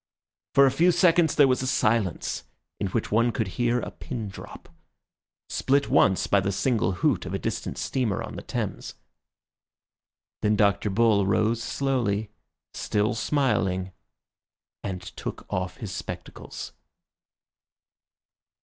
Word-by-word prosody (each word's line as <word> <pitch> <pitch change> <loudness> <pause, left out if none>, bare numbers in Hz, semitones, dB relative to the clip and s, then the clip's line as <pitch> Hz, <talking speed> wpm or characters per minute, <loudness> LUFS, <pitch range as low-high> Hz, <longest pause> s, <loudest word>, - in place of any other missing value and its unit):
For 140 - +8
a 135 - +4
few 175 +6 +4
seconds 175 -2 +4
there 145 - +6
was 130 -1 +2
a 130 - -2
silence 110 - 0 0.3
in - - 0
which - - -2
one 115 +3 +3
could 110 -4 -2
hear 120 +7 +1
a - - -5
pin 115 -6 -6
drop, 100 - -11 0.8
split 140 +1 +1
once 95 - +4
by 100 - +3
the 95 +1 -1
single 100 -3 +1
hoot 105 - +2
of 95 - -3
a - - +1
distant - - -4
steamer 120 -8 -1
on - - -7
the - - -6
Thames. - - -4 1.5
Then 105 0 +2
Dr. 100 0 +2
Bull 100 -1 +3
rose 110 +3 +2
slowly, 115 -8 -1 0.4
still 105 +1 0
smiling, 110 -7 0 0.9
and 95 -3 -4
took - - -7
off 90 0 -2
his 105 -5 -6
spectacles. - - -7
110 Hz, 130 wpm, -26 LUFS, 95-130 Hz, 1.5 s, For